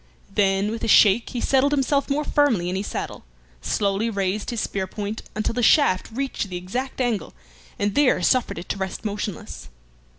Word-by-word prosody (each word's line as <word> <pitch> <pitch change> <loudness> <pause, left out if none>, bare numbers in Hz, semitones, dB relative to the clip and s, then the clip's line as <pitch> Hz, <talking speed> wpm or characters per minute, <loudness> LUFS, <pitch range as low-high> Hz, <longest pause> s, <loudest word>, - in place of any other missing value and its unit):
Then 195 0 +2
with 225 - -5
a - - 0
shake 210 +1 +5
he 245 - -4
settled 270 +3 +2
himself 280 0 +1
more 290 +2 +1
firmly 245 -14 +2
in - - -2
his 195 +2 -3
saddle, - - -5 0.4
slowly 200 +2 0
raised 200 -1 -2
his 235 - -3
spear 195 -3 -2
point 210 +3 -5
until 215 +1 -1
the 245 - -1
shaft 225 - +4
reached 260 -4 -3
the 180 - -4
exact 245 +11 -4
angle, 240 -5 -1 0.4
and 205 0 0
there 285 +1 +3
suffered 255 0 +2
it 175 - -7
to - - -2
rest 190 +2 -5
motionless. 205 -3 -5
215 Hz, 185 wpm, -23 LUFS, 195-255 Hz, 0.4 s, shake